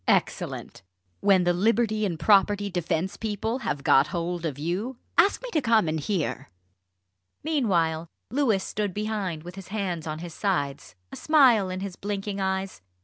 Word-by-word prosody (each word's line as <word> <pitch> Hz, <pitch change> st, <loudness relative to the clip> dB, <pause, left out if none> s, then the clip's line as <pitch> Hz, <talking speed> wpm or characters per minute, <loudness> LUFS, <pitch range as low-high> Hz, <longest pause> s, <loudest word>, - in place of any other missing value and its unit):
"Excellent! -, -, -1 dB, 0.4 s
When 195 Hz, -2 st, +4 dB
the 175 Hz, 0 st, +3 dB
Liberty 215 Hz, +2 st, +2 dB
and 170 Hz, -4 st, -4 dB
Property 205 Hz, 0 st, +3 dB
Defence 175 Hz, +2 st, -1 dB
people 220 Hz, +3 st, -2 dB
have 145 Hz, -, -3 dB
got 135 Hz, +2 st, +5 dB
hold 170 Hz, +1 st, -2 dB
of 145 Hz, -3 st, -5 dB
you 185 Hz, -, -3 dB, 0.2 s
ask 390 Hz, +8 st, +4 dB
me -, -, -6 dB
to 310 Hz, -, +1 dB
come 225 Hz, -7 st, +3 dB
and 155 Hz, 0 st, -1 dB
hear!" 175 Hz, +1 st, -2 dB, 0.9 s
Meanwhile, 175 Hz, -, +1 dB, 0.2 s
Louis 240 Hz, -8 st, +2 dB
stood 205 Hz, -3 st, -3 dB
behind, 205 Hz, -7 st, -3 dB
with 175 Hz, +1 st, -8 dB
his 195 Hz, -1 st, -10 dB
hands 185 Hz, -6 st, -3 dB
on 155 Hz, 0 st, -3 dB
his 170 Hz, 0 st, -7 dB
sides, 140 Hz, -, -2 dB, 0.2 s
a -, -, -7 dB
smile 255 Hz, -11 st, +4 dB
in 185 Hz, +1 st, -4 dB
his 195 Hz, -2 st, -5 dB
blinking 200 Hz, 0 st, -4 dB
eyes. 190 Hz, -, -2 dB
195 Hz, 160 wpm, -26 LUFS, 170-215 Hz, 0.9 s, got